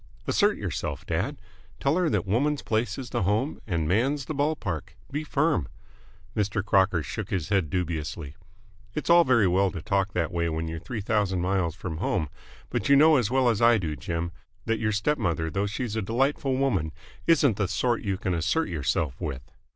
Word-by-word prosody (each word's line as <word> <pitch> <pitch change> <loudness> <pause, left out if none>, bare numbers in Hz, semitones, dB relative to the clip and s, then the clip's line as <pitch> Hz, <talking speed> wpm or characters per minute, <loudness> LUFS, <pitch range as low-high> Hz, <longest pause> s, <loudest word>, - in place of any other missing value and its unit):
"Assert - - +2
yourself, - - -4
dad! - - -1 0.4
Tell 140 +3 +2
her 180 -2 +2
that - - 0
woman's 140 +9 +1
place 110 -1 0
is 130 -2 -7
the - - 0
home 105 - 0
and 85 -5 0
man's 130 - +1
the 155 - -4
ball 150 +2 +1
park! 85 - -5 0.2
Be 145 +3 -2
firm!" 150 - +1 0.7
Mr. 105 -2 0
Crocker 95 -5 +3
shook - - -5
his 90 -4 -2
head 95 -7 +1
dubiously. 80 -3 -3 0.6
"It's 150 - 0
all 170 0 +8
very 120 -7 +4
well 95 +2 +3
to 85 - -6
talk 100 +1 0
that 85 -1 0
way 85 -1 0
when 80 +1 -2
you're 80 0 -4
three 110 +5 -5
thousand 100 -3 0
miles 90 -2 0
from 90 -4 -5
home, 80 -3 -1 0.4
but - - -1
you 140 - +7
know 155 +2 +7
as 120 -5 +1
well 130 0 +3
as 115 -2 +2
I 115 0 +6
do, 80 -6 -2
Jim, 85 +5 -3 0.3
that 115 -1 0
your 110 -1 +1
step 130 +9 0
mother, 80 -6 -1
though 100 +1 0
she's 110 +2 -3
a 110 - 0
delightful 130 +5 0
woman, 100 - +1 0.4
isn't 145 - +4
the 100 - +1
sort 115 +6 0
you 100 -2 -1
can 95 -1 -2
assert 125 - 0
yourself 75 -3 -1
with. 65 -4 -4
100 Hz, 195 wpm, -27 LUFS, 85-130 Hz, 0.7 s, all